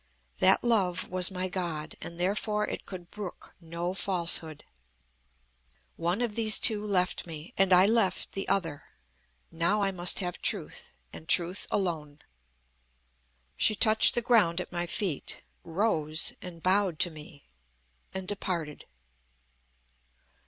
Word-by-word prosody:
That - - +4
love 190 -7 0
was 185 -1 +1
my 185 -1 -3
God, 170 -5 -4
and 170 0 -8
therefore 210 +3 -1
it - - -6
could 180 -3 -9
brook 205 -4 -8
no 170 +2 -4
falsehood. 170 -5 +2 1.3
One 175 +6 -1
of 235 -3 -2
these 215 -1 +4
two 210 -2 +4
left 185 -4 0
me, 160 -1 -9
and 195 0 +2
I 180 +1 +7
left 210 -4 +1
the 195 - -5
other. 165 -7 -2 0.7
Now 170 +6 +1
I 195 - +1
must 180 -1 +3
have 180 -2 -3
truth, - - -3 0.2
and 160 - -11
truth 180 +2 +1
alone." 155 -6 -3 1.3
She 215 - +2
touched 220 0 +6
the 240 - 0
ground 210 -8 +3
at 180 - -6
my 175 0 -3
feet, 175 -4 0 0.2
rose 160 -4 0
and 170 -2 -9
bowed 185 -2 +1
to 175 - +2
me, 150 -1 -13 0.7
and 190 -1 -6
departed. 175 -7 -3
180 Hz, 130 wpm, -28 LUFS, 170-200 Hz, 1.3 s, I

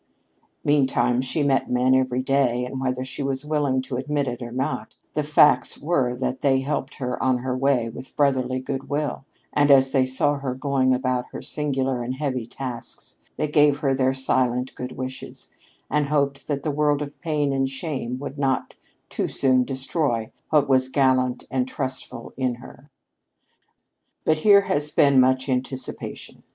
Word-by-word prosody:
Meantime 130 -4 +2
she 135 +4 -1
met 135 -1 +1
men 125 +1 +3
every 130 -1 +1
day, 130 -3 +1
and 130 +1 -5
whether 130 -1 -1
she 130 +2 -6
was 135 0 -1
willing 145 -4 0
to 130 -1 -4
admit 140 +1 -1
it 125 0 -4
or 120 -1 -6
not, 130 +5 -3 0.2
the 150 - 0
facts 150 0 +4
were 135 -6 0
that 130 +1 -3
they 135 -1 +3
helped 135 -1 -3
her 125 -2 -4
on 130 -1 +2
her 125 +1 -3
way 130 -3 +2
with 115 +3 -10
brotherly 130 -3 +1
good 135 +1 -5
will, 145 -2 -2 0.3
and 145 0 +3
as 135 -1 +6
they 135 -2 +3
saw 140 +3 +1
her 130 -2 -3
going 130 -1 +1
about 130 -1 0
her - - -6
singular 135 -4 -1
and 125 +2 -3
heavy 130 -5 -2
tasks, 125 -2 -7 0.2
they 155 - 0
gave 145 -1 +4
her 135 -2 +2
their 130 0 +2
silent 130 -1 0
good 125 0 -6
wishes, 130 0 -7 0.4
and 150 0 +1
hoped 140 -1 0
that 140 -2 -2
the 155 - 0
world 150 0 +1
of 145 0 -10
pain 150 -4 0
and 135 0 0
shame 135 -3 -4
would 140 +1 -7
not 135 -2 0 0.3
too - - -2
soon 130 -2 +3
destroy 130 -3 -1 0.2
what 150 -2 +3
was 130 -1 +3
gallant 130 -2 +2
and 130 -1 0
trustful 130 -1 -5
in 130 -2 -1
her. 130 +3 -14 1.4
But 155 - +3
here 200 +5 +6
has 150 -5 0
been 140 -2 +4
much 130 +1 +3
anticipation. 130 0 -4
130 Hz, 170 wpm, -24 LUFS, 130-145 Hz, 1.4 s, as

